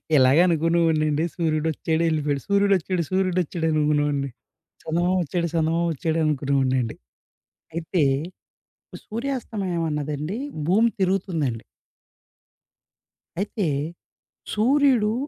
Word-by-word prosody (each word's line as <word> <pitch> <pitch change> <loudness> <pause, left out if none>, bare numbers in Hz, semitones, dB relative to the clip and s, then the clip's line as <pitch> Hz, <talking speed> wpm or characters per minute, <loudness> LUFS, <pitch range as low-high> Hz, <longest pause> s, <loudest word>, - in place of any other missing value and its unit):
ఇలాగే 135 +4 +6
అనుకునేవాడినండి 160 -2 +2
సూర్యుడొచ్చాడు 160 0 0
ఎళ్ళిపోయాడు. 145 -3 -1
సూర్యుడొచ్చాడు, 195 -3 +2
సూర్యుడొచ్చాడనుకునేవోడిని. 155 -6 +1 0.5
చందమామొచ్చాడు, 175 0 0
సందమామొచ్చాడు 165 0 0
అనుకునేవోడినండి. 135 -4 +1 0.8
అయితే 170 -1 0 1.1
సూర్యాస్తమయం 215 -8 -3
అన్నదండి 150 +6 -3 0.3
భూమి 220 +6 +4
తిరుగుతుందండి. 170 - 0 1.8
అయితే 205 -3 -2 0.9
సూర్యుడు 245 -1 +3
165 Hz, 65 wpm, -24 LUFS, 150-185 Hz, 1.8 s, ఇలాగే